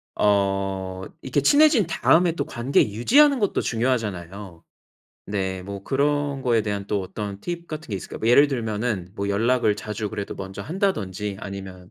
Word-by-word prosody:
어 95 Hz, -2 st, 0 dB, 0.2 s
이렇게 135 Hz, +2 st, 0 dB
친해진 285 Hz, -, +5 dB
다음에 170 Hz, +1 st, +3 dB
또 -, -, -3 dB
관계 130 Hz, +2 st, +1 dB
유지하는 275 Hz, -, +4 dB
것도 205 Hz, -3 st, +1 dB
중요하잖아요. 100 Hz, -7 st, -3 dB, 0.7 s
네 95 Hz, -2 st, -2 dB
뭐 100 Hz, 0 st, -7 dB
그런 140 Hz, +2 st, 0 dB
거에 120 Hz, -4 st, +2 dB
대한 100 Hz, -2 st, -3 dB
또 105 Hz, -, 0 dB
어떤 100 Hz, +1 st, -6 dB
팁 170 Hz, +4 st, -5 dB
같은 155 Hz, 0 st, -7 dB
게 100 Hz, -, -1 dB
있을까요? -, -, -8 dB
예를 140 Hz, +4 st, +7 dB
들면은 110 Hz, -7 st, -2 dB
뭐 100 Hz, 0 st, -2 dB
연락을 110 Hz, +1 st, +2 dB
자주 105 Hz, 0 st, -4 dB
그래도 100 Hz, 0 st, -5 dB
먼저 95 Hz, +1 st, -7 dB
한다든지 105 Hz, -, -2 dB
아니면 95 Hz, -3 st, -8 dB
105 Hz, 340 characters per minute, -24 LUFS, 100-140 Hz, 0.7 s, 예를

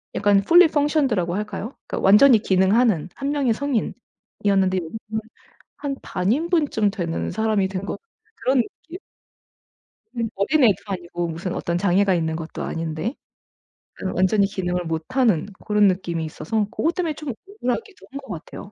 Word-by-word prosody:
약간 205 Hz, 0 st, +4 dB
fully 335 Hz, -, +6 dB
functioned 295 Hz, -4 st, +2 dB
라고 175 Hz, -1 st, -1 dB
할까요? 215 Hz, +3 st, -4 dB
그러니까 -, -, -3 dB
완전히 215 Hz, +4 st, +7 dB
기능하는 190 Hz, -1 st, +2 dB
1 275 Hz, +1 st, -2 dB
명의 275 Hz, -6 st, +1 dB
성인이었는데 205 Hz, -7 st, -1 dB
여기서는 220 Hz, +5 st, -5 dB, 0.6 s
한 275 Hz, -2 st, -3 dB
반 180 Hz, +2 st, -1 dB
인분쯤 295 Hz, -, +1 dB
되는 170 Hz, -4 st, -3 dB
사람이 220 Hz, -3 st, +1 dB
된 190 Hz, 0 st, -4 dB
거 -, -, -4 dB, 0.4 s
그런 265 Hz, -10 st, +1 dB
느낌. 330 Hz, +9 st, -12 dB, 1.2 s
음 230 Hz, -1 st, 0 dB
어린애도 230 Hz, +1 st, +3 dB
아니고 175 Hz, -2 st, -3 dB
무슨 170 Hz, +3 st, -4 dB
어떤 170 Hz, 0 st, -2 dB
장애가 195 Hz, +1 st, +3 dB
있는 160 Hz, -2 st, -1 dB
것도 160 Hz, 0 st, -6 dB
아닌데 165 Hz, -, -3 dB, 0.9 s
어 190 Hz, -, -1 dB
완전히 190 Hz, +3 st, +3 dB
기능을 180 Hz, -3 st, -2 dB
못하는 175 Hz, +3 st, +1 dB, 0.2 s
고런 210 Hz, -1 st, +4 dB
느낌이 175 Hz, -3 st, -1 dB
있어서 210 Hz, +7 st, -2 dB
고것 330 Hz, -, +1 dB
때문에 335 Hz, -4 st, -1 dB
좀 300 Hz, -1 st, -7 dB, 0.2 s
억울하기도 400 Hz, -, -4 dB
한 275 Hz, -, -6 dB
거 270 Hz, -, -13 dB
같아요. 175 Hz, +4 st, -9 dB
205 Hz, 375 characters per minute, -22 LUFS, 180-270 Hz, 1.2 s, 완전히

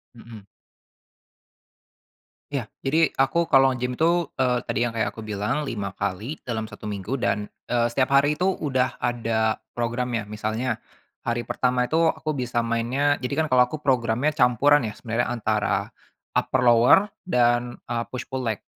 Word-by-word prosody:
Heeh. 115 Hz, -3 st, -12 dB, 2.1 s
Ya. 125 Hz, -6 st, -3 dB, 0.2 s
Jadi, 160 Hz, +4 st, +3 dB
aku 160 Hz, +5 st, +2 dB
kalau 135 Hz, -2 st, +5 dB
nge-gym 125 Hz, 0 st, -3 dB
itu, 170 Hz, 0 st, +2 dB
eee, 125 Hz, -2 st, +2 dB
tadi -, -, 0 dB
yang 115 Hz, -, -3 dB
kayak 115 Hz, -1 st, 0 dB
aku 110 Hz, -1 st, -10 dB
bilang, 105 Hz, +8 st, -2 dB
5 105 Hz, -6 st, -3 dB
kali 100 Hz, +9 st, -3 dB
dalam 110 Hz, -3 st, -3 dB
1 -, -, -11 dB
minggu, 105 Hz, +5 st, -3 dB
dan, 105 Hz, -1 st, -1 dB, 0.2 s
eee, 120 Hz, -1 st, +1 dB
setiap 130 Hz, +3 st, 0 dB
hari 145 Hz, +2 st, +4 dB
itu 185 Hz, -, 0 dB
udah 135 Hz, -9 st, 0 dB
ada 115 Hz, -2 st, 0 dB, 0.2 s
programnya. 120 Hz, -2 st, -2 dB
Misalnya, 110 Hz, +2 st, -2 dB, 0.5 s
hari 120 Hz, 0 st, 0 dB
pertama 125 Hz, 0 st, 0 dB
itu 160 Hz, -, +1 dB
aku 155 Hz, -2 st, -1 dB
bisa 120 Hz, -1 st, -1 dB
mainnya, 120 Hz, +5 st, +1 dB
jadi 125 Hz, +2 st, -4 dB
kan, 155 Hz, -, 0 dB
kalau 125 Hz, -1 st, +5 dB
aku 155 Hz, +1 st, -7 dB
programnya 125 Hz, 0 st, +1 dB
campuran 135 Hz, +1 st, +3 dB
ya, 105 Hz, -, -4 dB
sebenarnya, 115 Hz, +2 st, -2 dB
antara 110 Hz, -2 st, 0 dB, 0.5 s
upper-lower, 125 Hz, -, +4 dB, 0.2 s
dan, 120 Hz, -5 st, +1 dB
eee, 115 Hz, -1 st, -1 dB
push-pull 130 Hz, 0 st, -4 dB
leg. 110 Hz, -3 st, -2 dB
120 Hz, 150 wpm, -24 LUFS, 115-135 Hz, 2.1 s, kalau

